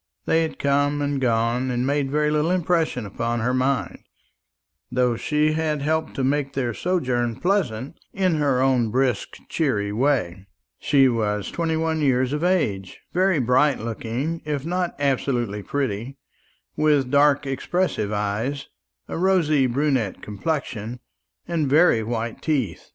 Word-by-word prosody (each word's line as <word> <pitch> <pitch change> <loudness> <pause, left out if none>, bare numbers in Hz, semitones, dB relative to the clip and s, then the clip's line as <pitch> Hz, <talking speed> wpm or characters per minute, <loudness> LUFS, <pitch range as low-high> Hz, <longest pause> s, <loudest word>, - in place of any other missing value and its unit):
They 165 - +3
had 160 - -3
come 145 +1 +1
and 145 -1 -1
gone, 120 +1 +1
and 125 0 -1
made 140 0 0
very 150 +1 +1
little 150 +2 +1
impression 170 -8 0
upon 115 +3 -2
her 125 +3 0
mind, 130 +1 0 0.9
though 125 -1 +2
she 150 +5 +1
had 155 -2 -1
helped 160 +1 -1
to 135 - -1
make 140 +1 0
their 125 -4 -1
sojourn 125 - -1
pleasant 160 - -1
in 185 -4 +1
her 140 -4 +2
own 125 -4 +2
brisk 130 +2 0
cheery 105 -11 0
way. 105 -7 0 0.3
She 135 -3 +4
was 105 -4 -1
twenty 165 -1 -1
one 160 -1 0
years 130 -1 +2
of 150 +2 -2
age, 105 - 0
very 185 0 +3
bright 130 +3 +3
looking, 115 +8 -3
if 150 -2 -3
not 180 +1 -1
absolutely 125 -6 0
pretty, 130 +1 -3 0.6
with 145 -4 +2
dark 145 0 +4
expressive 135 - -1
eyes, 105 +7 -2 0.4
a - - -4
rosy 165 -7 +3
brunette 130 -5 0
complexion, 120 -1 -4 0.5
and 160 -5 0
very 150 -5 +5
white 115 +1 -4
teeth. 130 - -2
135 Hz, 140 wpm, -23 LUFS, 120-155 Hz, 0.9 s, very